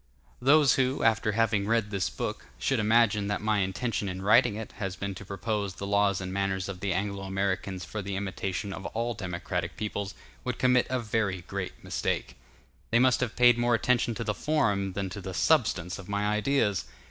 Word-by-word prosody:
Those 140 0 +6
who, 130 0 +1
after 110 -1 +2
having 110 -2 +1
read 115 -2 +1
this 100 -2 0
book, - - -5
should 120 - 0
imagine 110 -1 +3
that 100 - -1
my 105 -1 +1
intention 100 +2 -1
in 95 +1 -5
writing 115 +2 +5
it 110 0 -6
has 95 -2 -3
been 100 0 -4
to 95 - -9
propose 100 0 -3
the 100 - -5
laws 100 -1 +2
and 95 -1 -5
manners 95 -1 -1
of 95 -2 -6
the 100 +1 -1
Anglo 100 +2 -2
Americans 95 -1 -2
for 110 - -5
the 100 0 -4
imitation 95 0 -3
of 95 - -6
all 120 +1 0
democratic 90 -5 -4
peoples, 100 -1 -3 0.3
would 125 -2 -3
commit 125 -1 +3
a 130 0 0
very 105 -5 -1
great 95 0 -6
mistake; - - -2 0.5
they 115 - +3
must 125 +1 +4
have 125 -3 -2
paid 120 -1 +6
more 120 0 +3
attention 120 0 +1
to 115 - -3
the 105 -2 -1
form 105 -10 0
than 100 0 -2
to 100 - -6
the 95 0 -6
substance 95 - +2
of 95 - -10
my 100 0 0
ideas. 105 -1 +1
105 Hz, 195 wpm, -28 LUFS, 95-115 Hz, 0.5 s, Those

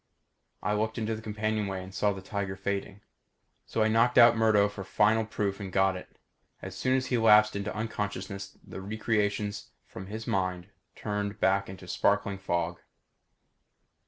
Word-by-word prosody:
I 105 - +1
looked 110 +2 -1
into 110 -1 -1
the 110 - -8
companionway 105 -3 -2
and 95 +1 -11
saw 105 +1 +1
the 95 -1 -7
tiger 100 -1 -3
fading. 100 +1 -4 0.7
So 110 - +1
I - - +3
knocked 115 +3 +3
out 120 -1 +8
Murdo 110 -2 +4
for 100 -1 -7
final 110 +3 +2
proof 100 -2 -2
and 95 -2 -6
got 95 0 +3
it. 90 - -10 0.4
As 95 -1 -8
soon 130 +6 +1
as 130 - -1
he 120 - +3
lapsed 105 -1 +6
into 100 +1 -3
unconsciousness 100 -3 -4
the 95 - -8
recreations 105 0 -1 0.2
from 95 - -9
his 110 +2 -6
mind 90 -1 -1 0.3
turned 105 0 -3
back 95 0 +2
into 95 -1 -10
sparkling 100 0 +1
fog. 85 -2 -2
100 Hz, 160 wpm, -29 LUFS, 95-110 Hz, 0.7 s, out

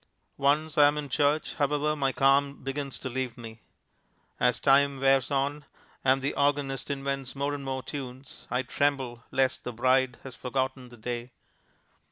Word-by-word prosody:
Once 150 +2 +2
I 145 - +9
am 145 +1 +1
in 145 -2 -4
church, 145 +3 +1
however, 150 +1 +1
my 135 -2 +1
calm 140 +1 +2
begins 135 0 -3
to - - -6
leave 130 -1 -3
me. 115 -1 -9 0.8
As 125 -1 +3
time 140 0 +4
wears 135 -1 +3
on, 140 +1 -1 0.4
and 135 0 +3
the 140 - 0
organist 140 -2 0
invents 140 -1 -3
more 140 +1 -1
and 145 -1 -5
more 130 -1 -3
tunes, 130 -1 -8
I 125 +1 0
tremble 130 -3 -1
lest 130 -1 +1
the 125 - -4
bride 130 +1 +2
has 130 -3 -9
forgotten 130 0 -3
the 120 - -14
day. 120 +2 -4
135 Hz, 165 wpm, -28 LUFS, 130-140 Hz, 0.8 s, I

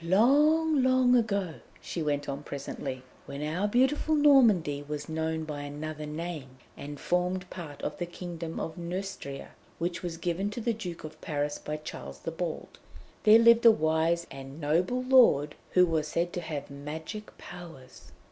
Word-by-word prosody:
"Long, 290 - +4
long 255 -1 +4
ago," 200 -7 +1 0.3
she 170 - -5
went 145 -1 -1
on 140 0 -4
presently, 140 -2 -6 0.2
"when 140 +1 -5
our 170 +7 0
beautiful 265 +7 +2
Normandy 230 - +5
was 145 0 -5
known 160 0 -2
by 150 -2 -5
another 150 +1 -6
name, 150 -4 -6 0.2
and 145 0 -8
formed 180 +1 0
part 155 -6 -8
of - - -3
the 175 - -2
kingdom 170 -2 -6
of 165 - -5
Neustria, 175 -5 -5 0.3
which 170 +1 -2
was 170 -2 -4
given 175 +4 -1
to 210 - -6
the 235 0 0
Duke 180 -6 -7
of 155 0 -9
Paris 145 -3 -2
by 150 0 -4
Charles 155 - -8
the 165 - -4
Bald, 165 0 -5 0.5
there 215 +1 +9
lived 235 0 +6
a 230 - +10
wise 160 -2 +2
and 135 +2 -9
noble 175 +12 +1
lord 240 - +5 0.2
who 180 0 +6
was 160 -3 0
said 170 +3 -1
to 175 - -3
have 150 -4 -5
magic 160 +9 -7
powers. 165 -8 -12
170 Hz, 165 wpm, -29 LUFS, 150-205 Hz, 0.5 s, a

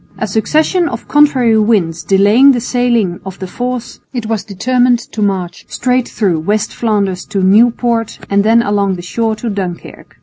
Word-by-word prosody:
A - - -2
succession 310 - +1
of 230 - -7
contrary 260 -7 +3
winds 195 -7 +1
delaying 210 +8 +4
the 245 - 0
sailing 235 -7 0
of 190 -1 -8
the 190 - -6
force, 245 +5 -5 0.2
it 240 -3 -3
was 220 -2 -2
determined 245 +5 +1
to 215 - -5
march 185 -4 -2
straight 250 0 -1
through 190 -7 0
West 205 +6 -1
Flanders 200 -5 -1
to 195 -3 -2
Nieuport 230 +3 +2
and 200 0 +1
then 230 +2 +3
along 200 -3 0
the 175 - -8
shore 225 +4 -2
to 215 +3 -6
Dunkirk. 185 -4 -7
220 Hz, 170 wpm, -14 LUFS, 195-245 Hz, 0.2 s, delaying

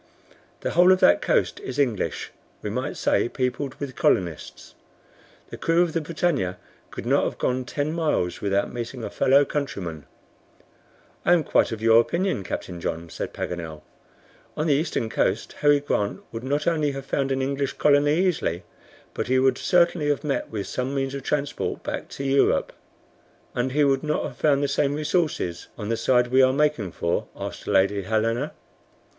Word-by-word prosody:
The - - -2
whole 180 +2 +6
of 185 - +4
that - - +5
coast - - +1
is 410 - -6
English, 125 -8 -1 0.3
we - - -3
might - - -3
say, - - +1
peopled 130 +2 -2
with 140 -3 -6
colonists. 85 -9 -1 0.8
The - - -6
crew 165 +1 +3
of 170 -3 -2
the 165 - 0
BRITANNIA 150 - -1 0.3
could - - -8
not - - +3
have - - -3
gone 130 0 -1
ten 145 +5 -2
miles 150 - 0
without 100 0 0
meeting 120 0 -5
a - - -5
fellow 140 +2 +4
countryman." 90 - -4 1.2
"I - - +5
am 170 -3 +3
quite - - +2
of 110 -1 -5
your 115 0 +7
opinion, 170 - -1
Captain 90 -1 -5
John," 80 0 -4
said - - -5
Paganel. 80 -3 -5 0.7
"On 155 - 0
the 155 - +3
eastern 145 -5 0
coast 110 -1 -1
Harry 145 -1 +5
Grant 105 -8 -1
would 115 +1 -6
not 145 +3 -1
only 155 -4 +1
have 135 -1 -6
found 135 0 -1
an 135 0 0
English 140 0 -1
colony 145 0 +3
easily, 120 - -1 0.5
but - - -3
he 130 +1 +2
would 130 0 +3
certainly 170 -4 +2
have 145 +1 0
met 145 -2 -2
with 105 -3 -4
some 130 +2 -3
means 135 0 -1
of 140 - -4
transport 145 +1 -2
back - - -4
to 140 - -6
Europe." 135 0 +2 0.8
"And 125 +2 -1
he 150 +1 +3
would 135 -1 +3
not 150 0 -1
have - - -6
found 145 -2 +2
the - - +2
same 140 0 +1
resources 150 - -1
on 105 -2 -5
the 115 - +1
side 125 +1 +2
we 130 +1 +5
are 130 0 +5
making 145 - +1
for?" 85 +1 -1
asked - - -7
Lady 100 +1 +3
Helena. 115 +7 -1
135 Hz, 180 wpm, -24 LUFS, 110-150 Hz, 1.2 s, your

